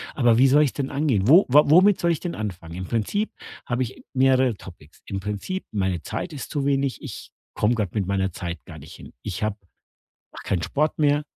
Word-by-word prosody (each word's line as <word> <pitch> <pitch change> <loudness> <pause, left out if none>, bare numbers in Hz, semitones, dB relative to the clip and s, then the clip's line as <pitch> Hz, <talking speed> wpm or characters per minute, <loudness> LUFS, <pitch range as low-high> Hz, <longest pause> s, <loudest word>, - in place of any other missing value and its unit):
aber 120 -4 +4
wie 135 +2 +6
soll 145 +3 +5
ich 140 - +2
es - - -14
denn 140 -2 -3
angehen? 135 -8 0
Wo 170 +8 +7
wa 150 +3 +7
womit 185 +5 +6
soll 170 0 +2
ich 160 - -1
denn 175 -2 -4
anfangen? 90 -6 -6
Im 95 0 -5
Prinzip 120 - -1 0.3
habe 125 +1 -1
ich 115 - -8
mehrere 130 -3 +3
Topics. 85 -6 -15
Im 95 - -4
Prinzip: 105 - -4
meine 95 -4 -1
Zeit 170 - -5
ist 140 - -7
zu 145 -3 -2
wenig. 140 -1 0
Ich - - -9 0.2
komme 115 +3 +1
grad 105 -5 -2
mit 100 -4 -1
meiner 95 -1 0
Zeit 85 0 -6
gar 80 -3 -10
nicht 75 +4 -12
hin. - - -12
Ich 105 +1 -4
habe 105 -1 -1 0.7
mache - - -11
keinen 90 -4 0
Sport 150 - -1
mehr. 145 0 +2
120 Hz, 220 wpm, -24 LUFS, 95-145 Hz, 0.7 s, Wo